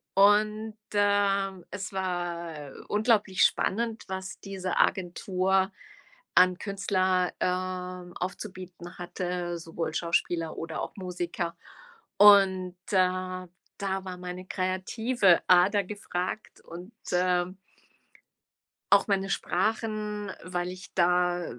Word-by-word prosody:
und, 210 Hz, +2 st, +4 dB, 0.2 s
ähm, 200 Hz, -2 st, +2 dB
es 190 Hz, +1 st, -5 dB
war 170 Hz, -5 st, -3 dB, 0.2 s
unglaublich 210 Hz, -3 st, +3 dB
spannend, 225 Hz, +2 st, +1 dB
was 190 Hz, -1 st, -5 dB
diese 190 Hz, -2 st, -4 dB
Agentur 190 Hz, +1 st, +1 dB, 0.7 s
an 180 Hz, 0 st, +6 dB
Künstler, 190 Hz, -2 st, 0 dB
ähm, 180 Hz, -1 st, -3 dB
aufzubieten 185 Hz, -2 st, -7 dB
hatte, 175 Hz, -1 st, -3 dB
sowohl 165 Hz, -1 st, -4 dB
Schauspieler 170 Hz, -1 st, 0 dB
oder 165 Hz, -1 st, -4 dB
auch -, -, -6 dB
Musiker. 180 Hz, -2 st, -4 dB, 0.6 s
Und 190 Hz, -3 st, +6 dB, 0.2 s
da 185 Hz, -1 st, +1 dB, 0.3 s
da 195 Hz, -1 st, -2 dB
war 185 Hz, -, -5 dB
meine 180 Hz, 0 st, -7 dB
kreative 185 Hz, +2 st, +2 dB
Ader 190 Hz, +3 st, +5 dB
gefragt 190 Hz, 0 st, -5 dB
und, 175 Hz, +6 st, -10 dB, 0.2 s
ähm 180 Hz, 0 st, +1 dB, 1.4 s
auch -, -, +6 dB
meine 195 Hz, -1 st, +1 dB
Sprachen, 210 Hz, +1 st, -1 dB
weil 180 Hz, -1 st, -3 dB
ich 185 Hz, +2 st, -10 dB
da 180 Hz, 0 st, +2 dB
185 Hz, 95 wpm, -28 LUFS, 180-200 Hz, 1.4 s, an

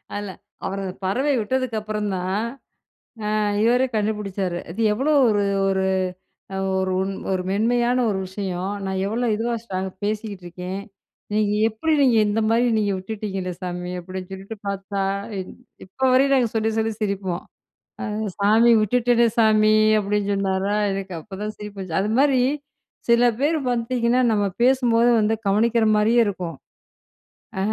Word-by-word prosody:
அதில. 205 Hz, -1 st, -4 dB, 0.4 s
அவரு 195 Hz, +1 st, -3 dB
அந்த 185 Hz, 0 st, -5 dB
பறவைய 265 Hz, +9 st, +1 dB
விட்டதுக்கு 255 Hz, +1 st, -1 dB
அப்பறந்தான், 205 Hz, -2 st, -2 dB, 0.9 s
அ -, -, +2 dB, 0.3 s
இவரே 245 Hz, +3 st, +3 dB
கண்டுபுடிச்சாரு. 200 Hz, -4 st, -1 dB
அது 205 Hz, +7 st, -6 dB
எவ்ளோ 270 Hz, +8 st, +1 dB, 0.2 s
ஒரு, 205 Hz, -1 st, +2 dB, 0.3 s
ஒரு, 190 Hz, 0 st, +1 dB, 0.7 s
அ -, -, -2 dB, 0.2 s
ஒரு, 190 Hz, 0 st, 0 dB, 0.4 s
ஒரு 185 Hz, -1 st, 0 dB
மென்மையான 240 Hz, +4 st, +2 dB
ஒரு 190 Hz, -2 st, -1 dB
விஷயம், 190 Hz, -1 st, -4 dB, 0.2 s
நான் 190 Hz, 0 st, -2 dB
எவ்ளோ 235 Hz, +3 st, -1 dB
இதுவா 235 Hz, +2 st, -1 dB
ஸ்ட்ரா 185 Hz, -5 st, -4 dB, 0.2 s
பேசிட்டுருக்கேன். 195 Hz, -3 st, -4 dB, 0.5 s
நீங்க 210 Hz, -1 st, +2 dB, 0.2 s
எப்பிடி 310 Hz, +9 st, -1 dB
நீங்க 245 Hz, -4 st, +4 dB
இந்தமாரி 225 Hz, +3 st, +2 dB
நீங்க 205 Hz, -2 st, +1 dB
விட்டுட்டீங்களே 195 Hz, -2 st, -4 dB
சாமி! 180 Hz, 0 st, -4 dB
அப்பிடின்னு 185 Hz, +1 st, -8 dB
சொல்லிட்டு 195 Hz, +3 st, -8 dB
பார்த்தா, 195 Hz, 0 st, -2 dB, 0.4 s
இன் 185 Hz, -, -6 dB, 0.3 s
இப்பவரையும் 265 Hz, +6 st, +2 dB
நாங்க 245 Hz, -4 st, +2 dB
சொல்லி, 220 Hz, 0 st, +1 dB
சொல்லி 220 Hz, 0 st, 0 dB
சிரிப்போம். 195 Hz, -4 st, -2 dB, 0.6 s
அ -, -, -3 dB, 0.3 s
"சாமி 220 Hz, +4 st, +5 dB
விட்டுட்டேனே 235 Hz, +2 st, +3 dB
சாமி!" 215 Hz, -1 st, +5 dB, 0.3 s
அப்பிடின்னு 205 Hz, 0 st, -1 dB
சொன்னாரா! 195 Hz, +1 st, 0 dB, 0.2 s
எனக்கு 195 Hz, -1 st, -4 dB
அப்பதான் 210 Hz, +4 st, -6 dB
சிரிப்பு 210 Hz, -1 st, -9 dB
வந்துச்சு. 185 Hz, -1 st, -2 dB
அது 210 Hz, -, -1 dB
மாரி 275 Hz, -3 st, +4 dB, 0.7 s
சில 235 Hz, +1 st, +5 dB, 0.2 s
பேர் 315 Hz, +2 st, +2 dB
பார்த்தீங்கன்னா, 240 Hz, +1 st, +1 dB
நம்ம 205 Hz, -1 st, +1 dB, 0.2 s
பேசும்போது 245 Hz, -2 st, +4 dB
வந்து 215 Hz, +1 st, +2 dB
கவனிக்கிற 225 Hz, +3 st, +3 dB
மாரியே 230 Hz, +3 st, +4 dB
இருக்கும், 180 Hz, -4 st, -4 dB, 1.0 s
ஆ -, -, -1 dB
210 Hz, 135 wpm, -23 LUFS, 190-235 Hz, 1.0 s, சாமி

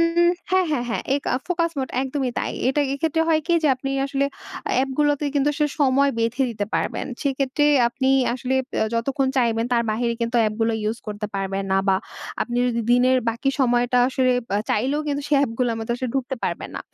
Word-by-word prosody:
হুম, 340 Hz, +1 st, +4 dB, 0.2 s
হ্যাঁ, 375 Hz, 0 st, +3 dB
হ্যাঁ, 260 Hz, -5 st, 0 dB
হ্যাঁ, 230 Hz, -, -2 dB
এ -, -, +3 dB
কা -, -, -1 dB, 0.2 s
ফোকাস 335 Hz, -2 st, +1 dB
মোড 260 Hz, -1 st, -2 dB
একদমই 265 Hz, -1 st, -2 dB
তাই। -, -, -2 dB, 0.2 s
এটাই 285 Hz, +2 st, +1 dB
এক্ষেত্রে 320 Hz, +3 st, 0 dB
হয় 315 Hz, -1 st, +3 dB
কি 345 Hz, -, +2 dB
যে, 305 Hz, -, +3 dB
আপনি 270 Hz, +1 st, -4 dB, 0.2 s
আসলে 275 Hz, 0 st, 0 dB, 0.5 s
অ্যাপগুলাতে 285 Hz, +2 st, +1 dB
কিন্তু 285 Hz, 0 st, +2 dB
আসলে 300 Hz, 0 st, +1 dB
সময় 280 Hz, 0 st, +4 dB
বেঁধে 230 Hz, +4 st, 0 dB
দিতে 210 Hz, -3 st, -3 dB
পারবেন -, -, -1 dB, 0.2 s
সেক্ষেত্রে 275 Hz, +1 st, 0 dB, 0.2 s
আপনি 265 Hz, +2 st, -1 dB, 0.3 s
আসলে 255 Hz, +1 st, -2 dB, 0.2 s
অ্যা -, -, +2 dB
যতক্ষণ 265 Hz, +4 st, 0 dB
চাইবেন 230 Hz, -3 st, +2 dB
তার 235 Hz, -1 st, +3 dB
বাইরে 235 Hz, +2 st, 0 dB
কিন্তু 235 Hz, +1 st, 0 dB
অ্যাপগুলো 225 Hz, +1 st, 0 dB
ইউজ 220 Hz, +2 st, -1 dB
করতে 210 Hz, 0 st, -4 dB
পারবেন 195 Hz, 0 st, -2 dB
না 190 Hz, -, +4 dB
বা 190 Hz, -, +4 dB, 0.5 s
আপনি 240 Hz, -, -4 dB
যদি 235 Hz, -1 st, 0 dB
দিনের 255 Hz, +1 st, +4 dB
বাকি 240 Hz, +4 st, -1 dB
সময়টা 245 Hz, 0 st, +2 dB
আসলে 260 Hz, -1 st, +2 dB, 0.2 s
বা 200 Hz, -, +1 dB
চাইলেও 270 Hz, +7 st, +1 dB
কিন্তু 285 Hz, 0 st, -1 dB
সেই 295 Hz, -, +3 dB
অ্যাপগুলার 235 Hz, -2 st, 0 dB
মতো 225 Hz, -, -5 dB
আসলে 255 Hz, +1 st, -3 dB
ঢুকতে 265 Hz, 0 st, -2 dB
পারবেন -, -, -3 dB
না। -, -, -4 dB
260 Hz, 195 wpm, -23 LUFS, 235-280 Hz, 0.5 s, হুম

